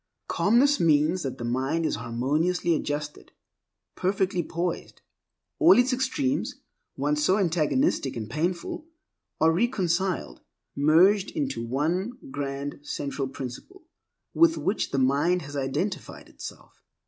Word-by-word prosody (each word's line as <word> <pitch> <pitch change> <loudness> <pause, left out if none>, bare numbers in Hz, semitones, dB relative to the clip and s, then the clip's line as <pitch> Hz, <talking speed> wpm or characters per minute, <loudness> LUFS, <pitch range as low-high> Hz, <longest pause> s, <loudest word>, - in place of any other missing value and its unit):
Calmness 265 +7 +3
means 155 +2 +3
that 135 -4 -4
the - - -6
mind 135 +7 0
is - - 0
harmoniously 150 +9 0
adjusted, 150 -1 -4 0.6
perfectly 190 -1 0
poised. 170 +1 -4 0.6
All 340 +2 +7
its 245 +1 +3
extremes 265 +2 -1 0.4
once 150 +2 0
so 185 +5 +3
antagonistic 170 - +1
and 110 -3 -4
painful 170 - -3 0.5
are 160 +1 +5
reconciled, 185 - 0 0.3
merged 175 +8 +4
into 280 - -3
one 160 - -1 0.2
grand 140 - -4
central 140 -1 -3
principle 135 - -8 0.5
with 330 0 +4
which 210 - -1
the - - -2
mind 145 +7 +2
has 145 0 -9
identified 145 +6 -3
itself. - - -11
165 Hz, 115 wpm, -26 LUFS, 140-200 Hz, 0.6 s, All